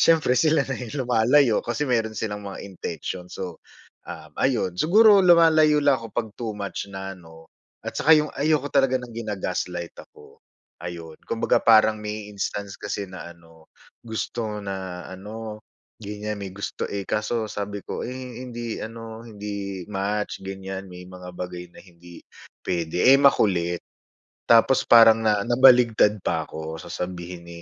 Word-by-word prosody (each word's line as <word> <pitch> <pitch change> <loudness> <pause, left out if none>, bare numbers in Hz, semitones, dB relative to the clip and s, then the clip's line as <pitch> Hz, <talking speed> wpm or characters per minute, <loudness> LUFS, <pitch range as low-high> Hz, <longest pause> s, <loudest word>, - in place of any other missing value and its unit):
siyempre 160 -6 +4
sila 150 +2 +3
na 135 -2 -5
yung 125 +3 -4
lumalayo, 120 +1 +4
kasi 120 +5 -2
meron 115 -5 0
silang 105 -2 -3
mga 100 -1 -8
intention 90 -1 -6
so 90 -2 -7 0.5
um, - - -9
ayon. 125 -9 +1
Siguro 205 +4 +6
lumalayo 165 -4 +5
lang 140 -4 +4
ako 115 - -7
pag 110 +1 -3
too 110 -3 -4
much 100 0 -5
na 95 0 -6
'no, 80 -3 -16 0.3
at - - -4
tsaka 160 +2 +5
yung 150 0 0
ayoko 145 -1 0
talaga 135 -2 +3
ng 125 -2 -8
gina-gaslight 90 -6 -4 0.2
ako, - - -18 0.4
ayon. 85 -2 -8
Kumbaga 115 - +1
parang 110 -1 +5
may 105 0 -6
instance 100 0 -4
kasi 100 - -3
na 95 -2 -9
ano, 80 -2 -18 0.3
gusto 110 -1 -4
na 95 -2 -5
ano, 105 +3 -8 0.4
ganyan, 105 0 -5
may 100 - -5
gusto, 100 +2 -5
eh, 100 -1 -4
kaso 110 +3 -1
sabi 100 -1 -5
ko, - - -5
"Eh 125 -1 -6
hindi 120 -2 -5
ano, 115 0 -8
hindi 100 -4 -6
match," 105 +1 -3
ganyan, 95 0 -7
"may 90 0 -10
mga 90 0 -11
bagay 90 -1 -6
na - - -14
hindi 85 -1 -15 0.4
puwede." 85 -1 -1
eh, 135 - +6
makulit. 90 -10 +2 0.6
Tapos 115 +3 +4
parang 115 -1 +7
na 105 -1 +3
nabaliktad 120 -4 +5
pa 80 -3 -1
ako 80 +1 -7
sasabihin, 90 -1 -6
105 Hz, 150 wpm, -24 LUFS, 95-120 Hz, 0.6 s, parang